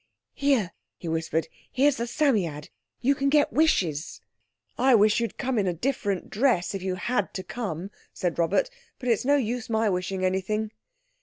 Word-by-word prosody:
"Here," 270 -10 +1 0.3
he 170 - -8
whispered; 160 0 -1 0.2
"here's 275 +1 +3
the 235 +1 -2
Psammead; 205 - 0 0.3
you 265 +3 +4
can 275 0 0
get 290 0 +3
wishes." 180 - +1 0.6
"I 260 0 +4
wish 215 +1 +4
you'd 230 -1 -3
come 260 -3 0
in 195 - +1
a 175 - 0
different 205 - -2
dress, 215 -6 +2
if 195 - -4
you 185 0 -2
had 205 +2 -1
to 190 - -3
come," 195 -6 -5 0.2
said 175 -2 -2
Robert; 180 - +2 0.3
"but 250 - -4
it's 230 +1 +2
no 285 +2 +4
use 245 -3 -1
my 220 -2 +2
wishing 185 +1 -1
anything." 210 +4 -1
215 Hz, 170 wpm, -26 LUFS, 185-255 Hz, 0.6 s, you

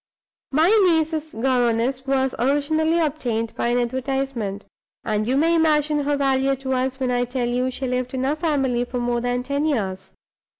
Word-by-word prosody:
My 315 +5 +4
niece's 320 -3 +1
governess 250 +2 0
was 265 -1 +1
originally 310 +5 +1
obtained 245 -8 -1
by - - -2
an 240 +1 +1
advertisement, 245 -4 -2 0.4
and 215 0 -1
you 260 +2 +1
may 325 +3 +3
imagine 305 -2 +2
her 290 0 +1
value 270 -1 +2
to 265 0 -3
us 260 +1 -1
when 255 -1 0
I 245 0 +1
tell 245 0 -2
you 250 +2 0
she 260 +1 -5
lived 250 +1 -2
in 260 0 -1
our 285 +3 +1
family 275 -7 0
for 245 +1 -5
more 240 0 -1
than 245 0 -1
ten 280 +3 -1
years. 200 -11 -2
265 Hz, 175 wpm, -22 LUFS, 245-290 Hz, 0.4 s, My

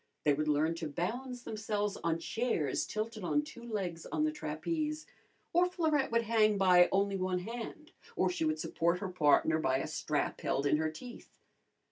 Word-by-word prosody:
They 145 - +4
would 155 +2 -1
learn 150 +2 +2
to 160 - -3
balance 245 - -4
themselves 210 -2 -2
on 165 -1 +1
chairs 170 - -1
tilted 215 -1 -4
on 295 +12 +1
two 300 -6 -11
legs 195 -8 -4
on 305 - -1
the 310 - +2
trapeze, 305 - -3 0.5
or 350 +1 +5
Florette 315 -7 +1
would 230 0 +2
hang 215 -2 +3
by 180 -2 +6
only 200 0 +1
one 185 -1 0
hand, 240 - -7 0.2
or - - +2
she 355 -2 -1
would 310 0 +1
support 170 +2 0
her 190 +1 -4
partner 160 -2 +3
by 130 -4 +2
a 135 - -2
strap - - -2
held 140 - 0
in 145 - +3
her 155 0 0
teeth. 240 +11 -11
205 Hz, 180 wpm, -32 LUFS, 165-250 Hz, 0.5 s, by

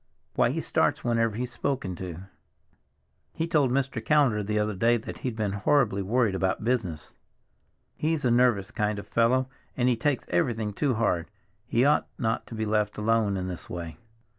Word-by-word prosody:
Why, - - +3
he - - -2
starts - - +1
whenever 115 -2 +1
he's 125 +2 -3
spoken 125 -7 -2
to. 90 -2 -6 1.1
He 165 - -2
told 150 -5 +3
Mr. 135 +1 -1
Callender 140 -8 +3
the 105 +1 -2
other 105 0 0
day 115 +5 +3
that 110 - -8
he'd 125 -3 -3
been 105 -3 -1
horribly 105 0 +2
worried 110 +1 +1
about 95 +1 -1
business. 105 -11 -2 0.8
He's 155 -2 -1
a 120 - +3
nervous 120 -5 +3
kind 105 0 -1
of 100 - -6
a - - -28
fellow, 125 +3 +3 0.3
and 125 -1 +2
he 125 - +3
takes 135 +3 -1
everything 105 +4 0
too 130 +3 0
hard. 90 -7 0 0.4
He 120 +3 +2
ought 150 - +3
not 115 -4 -1
to 115 - -8
be 110 0 -2
left 105 -1 0
alone 105 -2 +1
in 90 - -3
this 90 -2 -7
way." 85 -3 -6
110 Hz, 185 wpm, -27 LUFS, 100-125 Hz, 1.1 s, Why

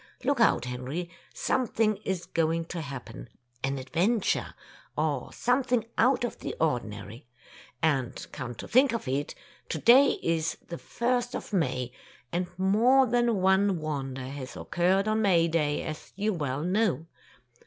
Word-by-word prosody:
Look 280 -3 +1
out, 230 - +4
Henry, 130 +8 -4 0.2
something 225 -4 +1
is 190 -4 -3
going 165 0 0
to 170 - -3
happen 135 -4 -8 0.2
— 120 0 -39
an 135 +1 0
adventure, 180 - 0 0.4
or 150 -4 -1
something 245 -2 +1
out 250 +2 +3
of 240 - -3
the - - -5
ordinary. 115 -6 -2 0.6
And 135 -6 0
come 130 -4 -6
to - - -8
think 260 0 +4
of 230 - -3
it, 140 +3 -2 0.3
to - - -2
day 265 +4 +6
is 165 -1 0
the 170 - -5
first 245 +1 -1
of - - -6
May, 130 -8 0 0.4
and 175 +1 -1
more 230 +8 +4
than 240 -4 +1
one 190 0 +3
wonder 135 -4 -4
has 130 -2 -7
occurred 190 +4 +1
on 215 0 +2
May 175 -5 +4
Day, 150 -3 0
as 155 0 -7
you 210 +2 0
well 145 -4 -2
know. 180 - +1
170 Hz, 150 wpm, -28 LUFS, 140-220 Hz, 0.6 s, day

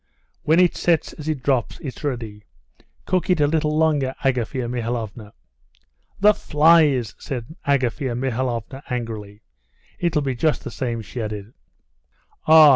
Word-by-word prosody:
"When 160 +3 +3
it 180 -2 +4
sets 170 -3 +1
as 155 0 -6
it 145 -5 -2
drops, 130 -5 0
it's 140 -3 -7
ready. 115 -7 -4 0.6
Cook 185 0 0
it 180 -3 +3
a 145 - +5
little 150 0 +1
longer, 145 -5 +2
Agafea 125 -1 0
Mihalovna." 115 -3 -4 0.9
"The 210 +2 +6
flies!" 150 - +4
said 130 +3 -6
Agafea 130 -2 0
Mihalovna 125 0 -2
angrily. 110 -4 -5 0.6
"It'll 165 -4 +1
be 135 -2 -1
just 150 +5 0
the - - -6
same," 120 -4 -3
she 120 +4 -6
added. 105 0 -5 0.9
"Ah! 155 -1 +9
130 Hz, 135 wpm, -22 LUFS, 115-155 Hz, 0.9 s, Ah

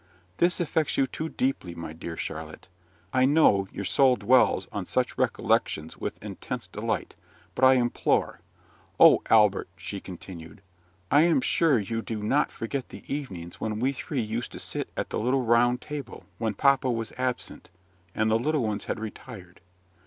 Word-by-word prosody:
"This 175 +1 +2
affects 160 -3 0
you 135 - +4
too 160 +4 -5
deeply, 130 - -2
my 85 -2 -7
dear 80 +1 -7
Charlotte. 80 +2 -6 0.5
I 130 0 +4
know 130 -10 +4
your 100 - -5
soul 130 +2 +4
dwells 130 +1 +3
on - - -4
such - - 0
recollections 80 +1 0
with - - -5
intense - - -6
delight; - - -3 0.4
but 130 - -4
I 130 0 +8
implore 120 -1 0 0.3
" - - -32
"O - - +8
Albert!" 105 -4 +4
she 100 +3 -6
continued, 90 0 -10 0.5
"I 145 - +6
am 170 +8 +4
sure 165 - +3
you 115 +2 -2
do 110 -2 -5
not 140 +7 +2
forget 130 +3 -4
the - - -11
evenings 95 - -6
when 110 -1 -2
we 130 +3 +1
three 135 0 -3
used 115 +2 -4
to - - -7
sit - - -4
at - - -3
the - - -1
little 125 +3 +1
round 120 +2 +3
table, 150 -3 -7
when 110 -2 -1
papa 135 +2 +3
was 115 -2 -2
absent, 130 -1 -4 0.5
and 110 0 +1
the 110 - +3
little 150 +1 0
ones 105 -2 -2
had - - -3
retired. 105 -4 -9
115 Hz, 170 wpm, -27 LUFS, 100-135 Hz, 0.5 s, I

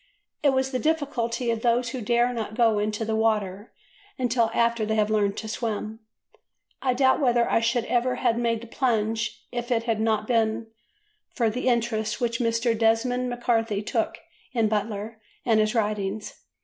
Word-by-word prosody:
It 290 - +4
was 265 0 +1
the 255 - -1
difficulty 255 -6 0
of 225 -1 -2
those 240 0 +2
who 255 0 -5
dare 240 +3 +2
not 220 -2 -4
go 225 -3 +3
into 210 +1 -1
the 220 0 -1
water 210 -2 0 0.5
until 240 -2 +1
after 235 -1 +1
they 220 +1 0
have 215 0 +1
learnt 205 -2 +1
to 220 - -5
swim. 220 -1 -3 0.8
I 255 -2 +1
doubt 260 0 +4
whether 240 -3 +3
I - - +3
should 230 +1 0
ever 250 +1 +1
have 230 - +1
made 230 -1 0
the - - -9
plunge 220 -2 -1
if 240 0 -4
it 230 -2 +2
had 225 -2 -1
not 220 -1 +1
been 225 -1 +1 0.6
for 230 -4 0
the 250 +3 -3
interest 230 -3 0
which 235 -1 -1
Mr. 230 0 +1
Desmond 235 +3 +1
MacCarthy 230 -4 0
took - - -1 0.4
in 230 -3 +2
Butler 215 +1 -3 0.2
and 225 -3 +4
his 215 +2 +1
writings. 210 -1 -2
230 Hz, 175 wpm, -25 LUFS, 215-240 Hz, 0.8 s, It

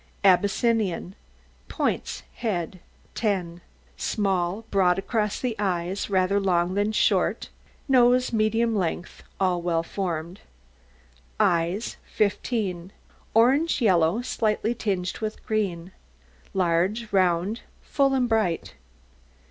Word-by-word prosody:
ABYSSINIAN. 200 -1 +2 0.5
POINTS - - -2
HEAD 185 -5 -3 0.3
10 180 -6 -2 0.4
Small, 195 0 -1
broad 185 -2 +3
across 210 +1 -1
the 245 -3 -2
eyes, 185 -1 -1
rather 190 +1 +2
long 180 -2 +1
than 205 +2 +1
short, 215 - +1 0.4
nose 250 -2 +4
medium 225 +1 +1
length, 175 -2 -3 0.2
all 180 -2 +1
well 170 -1 0
formed. 170 -1 -4 1.0
EYES 175 +5 +1
15 200 -4 -1 0.4
Orange 270 +9 +4
yellow, 185 -1 +3
slightly 220 -1 0
tinged 190 -6 -2
with 215 -1 -5
green, 190 -5 -2 0.6
large, 190 +5 0
round, 185 +3 +1 0.2
full, 275 -2 +1
and 250 -2 +2
bright. 215 -7 0
195 Hz, 100 wpm, -25 LUFS, 180-225 Hz, 1.0 s, nose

